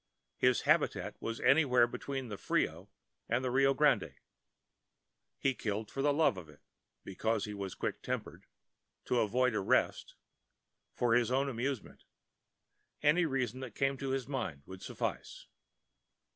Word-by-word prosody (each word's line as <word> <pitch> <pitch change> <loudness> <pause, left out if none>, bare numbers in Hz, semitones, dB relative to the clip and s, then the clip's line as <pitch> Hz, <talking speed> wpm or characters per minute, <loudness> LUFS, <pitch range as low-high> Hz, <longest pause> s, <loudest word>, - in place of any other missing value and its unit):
His - - +3
habitat - - +1
was 115 0 -3
anywhere 135 -5 +5
between 130 +1 -5
the 105 - -5
Frio - - -1 0.4
and 120 +3 +1
the 125 - 0
Rio 135 +1 +4
Grande. - - +2 1.2
He 135 - +1
killed 110 -2 -3
for 135 - -3
the 145 +1 +3
love 145 -7 +3
of 85 -4 -9
it—because 100 +8 -5
he 105 - -6
was 100 -2 -5
quick - - -3
tempered— - - -5 0.6
to 125 - +1
avoid 125 +3 +2
arrest—for 115 +3 -2
his 120 0 +3
own 135 +2 +1
amusement—any 140 - -3
reason 130 -3 -2
that 130 -5 -7
came 135 0 +1
to 135 0 -4
his 130 -2 -2
mind 85 - -4
would 95 0 -10
suffice. - - -4
125 Hz, 130 wpm, -33 LUFS, 110-135 Hz, 1.2 s, anywhere